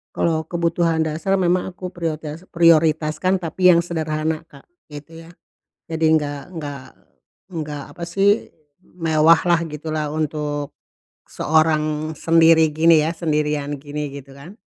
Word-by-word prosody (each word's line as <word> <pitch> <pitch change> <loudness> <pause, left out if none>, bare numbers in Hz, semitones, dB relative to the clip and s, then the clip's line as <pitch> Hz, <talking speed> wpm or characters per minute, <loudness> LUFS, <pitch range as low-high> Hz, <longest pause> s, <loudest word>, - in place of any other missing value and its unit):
Kalau 160 -1 0
kebutuhan 170 0 0
dasar 160 +5 0
memang 180 +1 0
aku 185 0 -7
prioritas 165 -2 -5
prioritaskan, 165 +2 +3
tapi 180 +2 +3
yang 170 - +4
sederhana, 160 -1 -3
Kak, 145 -4 -18 0.2
gitu 165 +3 -11
ya. 170 - -15 0.6
Jadi 160 -1 +1
nggak 145 -1 -5
nggak 145 -5 -7 0.6
nggak, 150 -5 -6
apa 170 - -5
sih, 200 +5 +1 0.3
mewah 165 -1 +3
lah, 170 -1 +3
gitu 155 0 -7
lah, 155 -1 -2
untuk 150 -2 -3 0.5
seorang 155 -1 +1
sendiri 160 -2 +4
gini 165 0 +5
ya, 165 - -2
sendirian 150 -3 -2
gini, 145 +1 -5
gitu 140 -1 -11
kan. 170 +10 -13
160 Hz, 130 wpm, -21 LUFS, 150-170 Hz, 0.6 s, gini